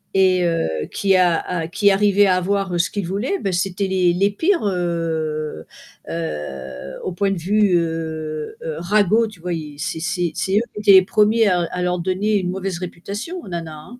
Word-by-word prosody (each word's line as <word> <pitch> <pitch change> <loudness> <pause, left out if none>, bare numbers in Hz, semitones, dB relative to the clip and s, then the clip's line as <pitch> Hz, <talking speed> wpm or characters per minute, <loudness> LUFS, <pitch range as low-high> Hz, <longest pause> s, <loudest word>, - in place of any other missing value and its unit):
et 185 -1 +4
heu 80 - -1
qui 195 -1 +2
a 180 -2 +4
a 170 -3 -3
qui 200 +3 +3
arrivaient 205 +1 +4
à 185 -2 +3
avoir 190 -1 -1
ce 170 - +2
qu'ils 200 -4 -3
voulaient, 205 - -1
ben 195 - -2
c'était 190 +2 -1
les 185 -2 +2
les 195 +3 +2
pires, 335 - +1
heu 165 -4 -2 0.4
heu, 70 -5 -5
au - - -3
point 195 +3 0
de 195 - -1
vue, 200 +3 +2
heu 160 -2 -3
heu, 160 -2 -4
ragots 210 +5 +3
tu 210 -4 -13
vois? 180 +1 -4 0.3
C'est 160 +2 -3
c'est 180 0 -1
c'est 190 +5 0
eux - - +4
qui - - -6
étaient 210 -1 +5
les 190 -1 +8
premiers 215 +2 +3
à 180 -3 +3
à 180 - -3
leur 180 0 0
donner 190 +4 0
une 185 -2 -1
mauvaise 190 -1 -3
réputation, 200 - -6
aux - - -11
nanas, 165 -3 -5 0.2
hein. 245 - -12
180 Hz, 195 wpm, -21 LUFS, 165-200 Hz, 0.4 s, les